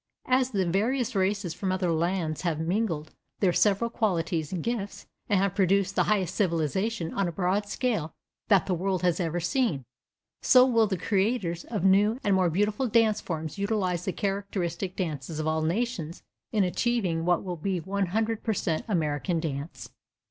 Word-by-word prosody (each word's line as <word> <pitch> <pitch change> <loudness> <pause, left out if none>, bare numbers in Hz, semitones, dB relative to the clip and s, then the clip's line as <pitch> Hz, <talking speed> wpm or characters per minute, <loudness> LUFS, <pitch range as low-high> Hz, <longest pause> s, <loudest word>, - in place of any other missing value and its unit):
As 255 0 +2
the 195 -6 0
various 230 +8 0
races 195 -2 0
from 185 +2 -2
other 185 -2 0
lands 165 -2 -1
have 170 -4 -1
mingled 165 -3 -1 0.3
their 185 -3 +3
several 210 +5 +2
qualities 170 -8 -1
and 180 -4 -3
gifts, 230 -4 -3 0.2
and 200 - +3
have 195 0 +1
produced 195 0 +2
the - - +3
highest 195 -5 +1
civilization 180 +1 -1
on 195 -2 0
a - - -2
broad 190 +4 0
scale 210 -9 -1 0.4
that 200 -5 +4
the 190 - 0
world 185 +1 -1
has 180 0 +2
ever 175 -1 -1
seen, 175 - 0 0.6
so 255 -1 +7
will 230 -4 +3
the 190 -2 -1
creators 190 -2 0
of 210 -6 -3
new 205 +5 +4
and 200 - +2
more 185 -2 +3
beautiful 210 +8 0
dance 220 -2 +3
forms 160 +1 -5
utilize 195 -4 -1
the 190 - 0
characteristic 195 -2 -3
dances 155 -4 -4
of 155 - -2
all 160 0 0
nations 175 -1 -2 0.3
in 210 -3 +2
achieving 185 -3 0
what 175 0 +2
will 180 -2 -4
be 185 +3 -2
the 170 +1 -8
100 205 +3 -1
per 220 - 0
cent 160 -5 -1
American 165 -1 0
dance. 150 -1 -5
190 Hz, 175 wpm, -27 LUFS, 170-210 Hz, 0.6 s, so